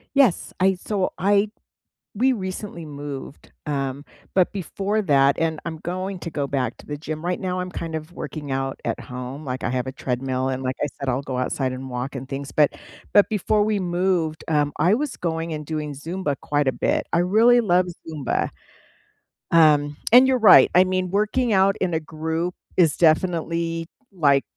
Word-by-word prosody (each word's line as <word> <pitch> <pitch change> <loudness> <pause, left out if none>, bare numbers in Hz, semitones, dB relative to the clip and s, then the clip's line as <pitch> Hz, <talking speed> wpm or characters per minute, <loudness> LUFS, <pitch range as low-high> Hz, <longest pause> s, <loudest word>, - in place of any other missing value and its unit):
Yes, 265 -10 +3
I 190 +1 +4
so, 190 +1 -2
I 205 +2 +3 0.7
we 255 +5 +3
recently 185 -5 -5
moved, 145 -1 -8
um, 140 -1 -3 0.3
but 185 -2 +3
before 200 +2 -2
that 140 -6 +4
and 160 -1 0
I'm 165 -1 -4
going 185 +2 -4
to 170 - -5
go 145 -2 -2
back 130 -4 -2
to - - -15
the 150 - -5
gym, 155 +2 -6
right 180 0 -1
now 185 -1 -2
I'm 180 0 -4
kind 165 -2 -5
of 160 +2 -6
working 150 -5 -6
out 135 0 -2
at - - -2
home, 125 +4 -7
like, 130 -1 -4
I - - 0
have 130 0 -1
a - - -3
treadmill, 130 0 -2
and, 130 0 -2
like 130 0 -2
I 145 - +1
said, 140 - -2
I'll 130 +2 0
go 130 -2 -4
outside 130 +1 -1
and 130 +1 -6
walk 125 +2 -4
and 130 0 -6
things, 140 +1 -5
but 150 -2 +3 0.4
but 205 - +6
before 210 0 +1
we 210 -1 0
moved, 175 -3 0
um, 150 -3 +1
I 175 +7 +3
was 280 +3 -1
going 165 -1 -2
and 150 -1 -5
doing 150 -1 -4
Zumba 155 +1 -3
quite 145 -2 0
a - - +4
bit. - - -1
I 170 - +4
really 225 +7 +5
love 180 -3 +2 0.2
Zumba. 150 -5 -1 1.0
Um, 150 -3 +4
and 255 +2 +8
you're 260 -1 +3
right. 215 -5 +8
I 180 - +8
mean, 185 0 -1
working 215 +4 +1
out 195 0 +4
in 180 -3 -1
a 160 - +1
group 160 +2 -3 0.2
is 165 -5 +4
definitely, 165 0 +1 0.2
like 140 -7 +3
160 Hz, 190 wpm, -23 LUFS, 140-185 Hz, 1.0 s, and